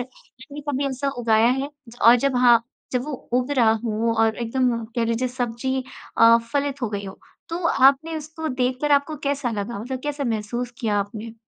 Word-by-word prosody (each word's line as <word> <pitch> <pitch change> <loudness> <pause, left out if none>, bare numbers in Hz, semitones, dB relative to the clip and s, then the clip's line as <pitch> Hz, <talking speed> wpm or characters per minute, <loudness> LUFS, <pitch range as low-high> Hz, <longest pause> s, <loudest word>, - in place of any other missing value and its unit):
आपने 260 +3 -11
कभी 280 0 -1
ऐसा 275 +1 -2
उगाया 225 0 +3
है? 270 +3 -1 0.2
ज 230 - -13
और 235 +2 +8
जब 265 +1 0
हाँ 240 -2 +5 0.3
जब 250 -1 0
वो 300 - -5 0.2
उग 250 +2 +1
रहा 230 -3 +5
हो 225 +1 0
और 225 -1 +3
एकदम 240 0 0
कह 235 - +2
लीजिए 230 +2 0
सब्ज़ी 250 +1 -2 0.4
अ, 230 0 +8 0.2
फलित 285 -1 -1
हो 240 - 0
गई 200 -1 -4
हो 190 0 -9 0.3
तो 335 - -3
आपने 280 +3 +3
उसको 315 +1 -5
देखकर 255 +2 0
आपको 285 +2 +2
कैसा 280 -3 -1
लगा? 210 0 -4
मतलब 250 +4 -5
कैसा 290 -1 -2
महसूस 235 +2 -2
किया 215 -4 0
आपने? 210 +3 -5
250 Hz, 190 wpm, -23 LUFS, 230-275 Hz, 0.4 s, और